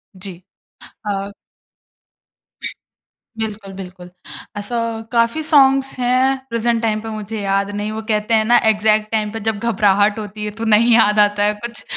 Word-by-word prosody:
जी। 185 -1 -8 0.7
अ 200 0 -3 2.1
बिल्कुल, 205 -3 -5
बिल्कुल। 180 -1 -10 0.5
ऐसा 205 +4 -4 0.3
काफ़ी 235 +5 +1
सॉन्ग्स 270 -3 +4
हैं, 255 +2 +2
प्रेजेंट 230 0 0
टाइम 215 -2 0
पे 225 - -7
मुझे 215 0 -5
याद 195 0 0
नहीं। 210 +1 -3
वो 220 0 -4
कहते 210 +1 0
हैं 215 - 0
ना - - +8
एक्ज़ैक्ट 215 0 +1
टाइम 215 -1 -1
पे - - -3
जब 215 -2 0
घबराहट 205 +1 +2
होती 210 0 -7
है, 210 - -3
तो - - -3
नहीं 235 +3 +5
याद 210 -2 +4
आता 205 0 +3
है - - 0
कुछ। 235 0 -8
215 Hz, 155 wpm, -19 LUFS, 205-230 Hz, 2.1 s, ना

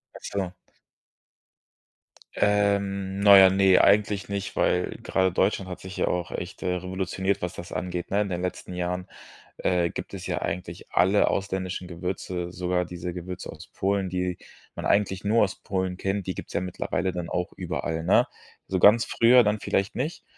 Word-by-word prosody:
Ach - - -10
so. 95 -3 -3 1.8
Ähm, 100 -1 +1
na 100 -1 +9
ja, 95 -1 +9
ne, 95 -1 +5
eigentlich 100 0 +3
nicht, 100 -1 -4
weil 90 0 +1
gerade 95 -1 +1
Deutschland 95 +1 0
hat 90 - -6
sich 95 -1 -9
ja - - +1
auch 90 -1 -1
echt, 90 - -6
äh, 90 - 0
revolutioniert, 95 +1 -2
was 90 +1 -3
das 85 - -9
angeht, 90 -1 -4
ne? 100 - +2
In 100 - -2
den 90 -1 -3
letzten 90 0 -4
Jahren, 90 +1 -3 0.5
äh, 90 -2 +1
gibt - - -7
es - - -7
ja - - -2
eigentlich 90 -1 -5
alle 95 +4 +4
ausländischen 95 -2 -3
Gewürze, 90 0 -4
sogar 90 -1 -1
diese 90 0 -6
Gewürze 90 +1 -6
aus - - -12
Polen, 100 0 -1
die 90 -1 -2 0.4
man - - -6
eigentlich 100 -1 +1
nur 110 +2 +3
aus 100 - -5
Polen 95 -1 -2
kennt, 95 +1 -2
die 95 - -2
gibt - - -8
es - - -10
ja - - +1
mittlerweile 90 0 -2
dann 90 -2 -4
auch 90 +1 -2
überall, 80 -1 -3
ne? - - +4 0.4
So 95 - 0
ganz 105 +5 +6
früher 120 +2 +5
dann 105 0 0
vielleicht 100 0 0
nicht. 145 +7 -3
95 Hz, 180 wpm, -26 LUFS, 90-100 Hz, 1.8 s, na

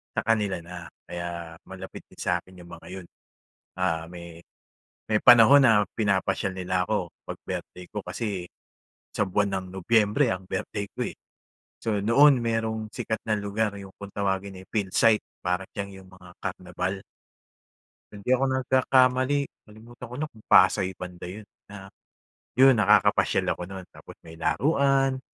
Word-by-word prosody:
sa - - +2
kanila 105 -5 +1
na 85 -1 -9 0.2
kaya 85 -1 -6
malapit - - -9
din - - -18
sa 90 0 +1
akin 95 -1 -17
yung 85 0 -13
mga - - -15
yun. 95 -2 -8 0.7
Ah 80 -3 0
may 85 -1 -10 0.7
may 105 - +3
panahon 125 +3 +8
na 105 -4 +5
pinapasyal 95 -2 0
nila 90 0 -1
ako 100 -6 -1 0.2
pag - - -6
birthday 90 0 -6
ko 105 - -4
kasi, 100 -6 -4 0.7
sa 105 - +1
buwan 100 +1 +1
ng 95 - -10
Nobyembre 110 +6 +2
ang 95 0 -6
birthday 100 -1 -3
ko - - -1
eh. - - -14 0.7
So 110 -3 0
noon 130 +7 +5
merong 110 -1 -1
sikat 110 -2 -3
na 110 - +3
lugar 100 +1 -1
'yung 95 -1 -10
kung 100 0 -8
tawagin 100 -1 -2
ay 95 - -15
Philsite 105 +1 +2 0.2
para 90 +1 0
siyang 100 -1 -4
'yong 95 - -18
mga 90 -1 -15
karnabal. 90 +1 -4 1.1
Kung 100 -1 -11
di 125 - -1
ako 130 +1 +2
nagkakamali, 130 +1 +3 0.3
nalimutan 115 +3 -12
ko - - -6
na 155 0 -3
kung 110 -4 -20
Pasay 95 0 +5
banda 90 -1 -8
yun 100 +4 -8 0.2
na, 95 -1 -11 0.7
yun 135 +1 +8
nakakapasyal 105 -3 +3
ako - - -7
no'n 95 -1 -8
tapos - - -13
may 80 0 -11
laruan, 135 - +2
100 Hz, 155 wpm, -26 LUFS, 90-115 Hz, 1.1 s, panahon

